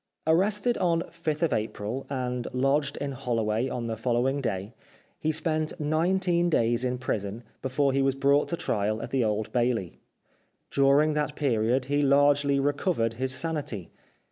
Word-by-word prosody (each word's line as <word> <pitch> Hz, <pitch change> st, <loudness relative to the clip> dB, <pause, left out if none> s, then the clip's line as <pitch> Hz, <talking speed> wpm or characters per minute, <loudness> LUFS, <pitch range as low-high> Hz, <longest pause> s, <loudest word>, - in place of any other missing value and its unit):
Arrested 205 Hz, +8 st, +2 dB
on 170 Hz, -2 st, +2 dB
5th 160 Hz, -2 st, -2 dB
April, 110 Hz, +4 st, -4 dB
and 125 Hz, -2 st, -3 dB
lodged 140 Hz, +2 st, +1 dB
in 140 Hz, -1 st, -3 dB
Holloway 115 Hz, -2 st, -1 dB
on 125 Hz, -2 st, -3 dB
the 115 Hz, -1 st, -2 dB
following 125 Hz, +4 st, 0 dB
day, 100 Hz, -3 st, -3 dB, 0.5 s
he 155 Hz, -, 0 dB
spent 155 Hz, +1 st, -1 dB
nineteen 175 Hz, +3 st, +1 dB
days 120 Hz, -5 st, +2 dB
in 125 Hz, 0 st, -1 dB
prison 110 Hz, -3 st, -3 dB, 0.2 s
before 135 Hz, +1 st, +1 dB
he 135 Hz, -, +2 dB
was 135 Hz, 0 st, +2 dB
brought 140 Hz, +1 st, +3 dB
to 170 Hz, -, -2 dB
trial 110 Hz, -3 st, -1 dB
at -, -, -7 dB
the 135 Hz, -2 st, +2 dB
Old 105 Hz, 0 st, -1 dB
Bailey. 120 Hz, -7 st, -1 dB, 0.7 s
During 140 Hz, +3 st, +4 dB
that 150 Hz, 0 st, -1 dB
period 125 Hz, -2 st, +1 dB
he 145 Hz, +2 st, +1 dB
largely 140 Hz, 0 st, +4 dB
recovered 140 Hz, -, 0 dB
his 130 Hz, +2 st, -2 dB
sanity. 140 Hz, -, -3 dB
135 Hz, 150 wpm, -27 LUFS, 120-150 Hz, 0.7 s, During